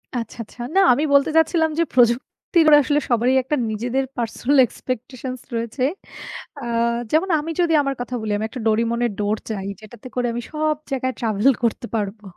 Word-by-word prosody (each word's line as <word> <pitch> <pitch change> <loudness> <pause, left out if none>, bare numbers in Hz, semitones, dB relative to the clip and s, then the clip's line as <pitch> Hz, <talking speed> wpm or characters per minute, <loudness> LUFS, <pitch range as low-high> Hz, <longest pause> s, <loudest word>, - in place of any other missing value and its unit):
আচ্ছা, 230 -2 -4
আচ্ছা। 225 - -20 0.2
না, - - +6
আমি 290 +5 0
বলতে 280 +1 +5
চাচ্ছিলাম 320 0 +3
যে - - +5
প্রযুক্তির 250 +7 +2
আসলে 290 +1 +1
সবারই 240 +1 +2
একটা 290 +4 -1
নিজেদের 240 +5 -1
পার্সোনাল 240 +4 0
এক্সপেকটেশনস 255 +1 -6
রয়েছে। 230 +3 -3 0.8
আ 275 - -8 0.5
যেমন 325 +5 +2
আমি 315 +2 -4
যদি 335 -2 +2
আমার 275 -1 -2
কথা 250 0 -4
বলি 215 -1 -3
আমি 215 - -2
একটা 255 - -7
Doraemon 230 +2 +1
এর 235 - 0
ডোর 210 +1 0
চাই, 195 -3 -4
যেটাতে 215 +3 -12
করে 245 -1 0
আমি 240 - -3
সব 305 0 0 0.2
জায়গায় 260 -1 -1
ট্রাভেল 220 +3 +3
করতে 235 +1 0
পারবো। 210 0 -3
245 Hz, 175 wpm, -21 LUFS, 225-280 Hz, 0.8 s, না